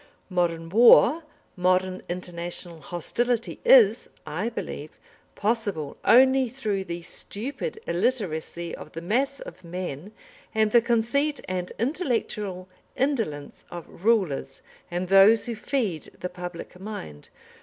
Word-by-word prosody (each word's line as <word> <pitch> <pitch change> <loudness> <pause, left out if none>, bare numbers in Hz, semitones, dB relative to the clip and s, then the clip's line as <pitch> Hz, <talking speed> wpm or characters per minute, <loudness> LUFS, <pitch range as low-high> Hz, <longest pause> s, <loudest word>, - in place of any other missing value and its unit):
Modern 170 -2 0
war, 240 - +7 0.3
modern 185 +1 +1
international 175 -1 -4
hostility 230 - -2
is, - - +6 0.2
I 230 - -2
believe, 155 -9 -6 0.5
possible 205 -9 -1
only 260 +1 +5
through 215 -6 -2
the 170 -1 -5
stupid 275 - -5
illiteracy 170 -5 -2
of - - -11
the 165 - -6
mass 265 +8 0
of - - -10
men 175 0 -6 0.4
and 220 -1 +3
the 235 - +6
conceit 240 +6 +1
and 180 -1 -3
intellectual 225 - -2 0.3
indolence 225 - -2
of 175 0 -10
rulers 185 - +1 0.3
and 175 +1 -2
those 195 +3 +6
who 235 - -3
feed 215 - -2
the 180 - -4
public 180 0 -8
mind. 130 - -8
195 Hz, 115 wpm, -26 LUFS, 175-235 Hz, 0.5 s, war